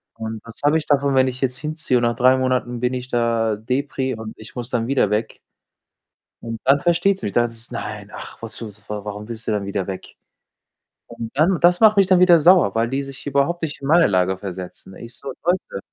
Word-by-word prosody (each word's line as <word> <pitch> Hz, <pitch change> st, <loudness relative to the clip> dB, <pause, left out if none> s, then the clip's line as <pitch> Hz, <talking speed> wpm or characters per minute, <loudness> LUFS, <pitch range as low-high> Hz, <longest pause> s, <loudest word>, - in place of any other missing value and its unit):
Und 110 Hz, 0 st, -5 dB
was 115 Hz, -, -11 dB
habe 155 Hz, +2 st, +4 dB
ich 150 Hz, -, -9 dB
davon, 140 Hz, -1 st, +2 dB
wenn 130 Hz, 0 st, +4 dB
ich 130 Hz, +1 st, -5 dB
jetzt 130 Hz, -1 st, -1 dB
hinziehe 150 Hz, -4 st, -1 dB
und -, -, -3 dB
nach 120 Hz, 0 st, +1 dB
3 130 Hz, +1 st, +5 dB
Monaten 125 Hz, -2 st, -1 dB
bin 125 Hz, +1 st, 0 dB
ich 125 Hz, 0 st, -5 dB
da 115 Hz, -2 st, +1 dB
depri 130 Hz, +3 st, -2 dB
und 110 Hz, 0 st, -8 dB
ich 110 Hz, +3 st, -13 dB
muss 120 Hz, 0 st, -5 dB
dann 115 Hz, -1 st, -1 dB
wieder 130 Hz, -7 st, +1 dB
weg? 105 Hz, +2 st, -2 dB, 1.0 s
Und 115 Hz, -1 st, -5 dB
dann 140 Hz, +1 st, +5 dB
versteht 175 Hz, +3 st, +2 dB
sie -, -, -3 dB
mich, 100 Hz, -, -5 dB
da 120 Hz, -, +4 dB
heißt 115 Hz, -1 st, -4 dB
es: 115 Hz, +1 st, -10 dB
„Nein, 105 Hz, -3 st, -6 dB
ach, -, -, -10 dB
wozu, 115 Hz, 0 st, -7 dB
w 105 Hz, 0 st, -16 dB
warum 105 Hz, 0 st, -6 dB
willst 115 Hz, -1 st, -7 dB
du -, -, +1 dB
denn 105 Hz, -2 st, -1 dB
wieder 100 Hz, -1 st, -2 dB
weg?“, 95 Hz, -1 st, -8 dB, 0.9 s
und 115 Hz, -1 st, -7 dB
dann 170 Hz, +5 st, +3 dB
das 175 Hz, +1 st, +4 dB
macht 215 Hz, -2 st, +6 dB
mich 195 Hz, -, +6 dB
dann 185 Hz, -2 st, +4 dB
wieder 175 Hz, -2 st, +7 dB
sauer, 170 Hz, -, +5 dB
weil 115 Hz, +1 st, +2 dB
die 135 Hz, +3 st, -2 dB
sich 135 Hz, -1 st, -9 dB
überhaupt 145 Hz, +5 st, 0 dB
nicht 145 Hz, -3 st, -4 dB
in 135 Hz, -, -5 dB
meine 165 Hz, +2 st, +5 dB
Lage 95 Hz, -1 st, +1 dB
versetzen. 95 Hz, 0 st, -8 dB
Ich 120 Hz, +2 st, -11 dB
so: 135 Hz, 0 st, -7 dB
„Leute, 175 Hz, -, -1 dB
125 Hz, 230 wpm, -21 LUFS, 110-145 Hz, 1.0 s, wieder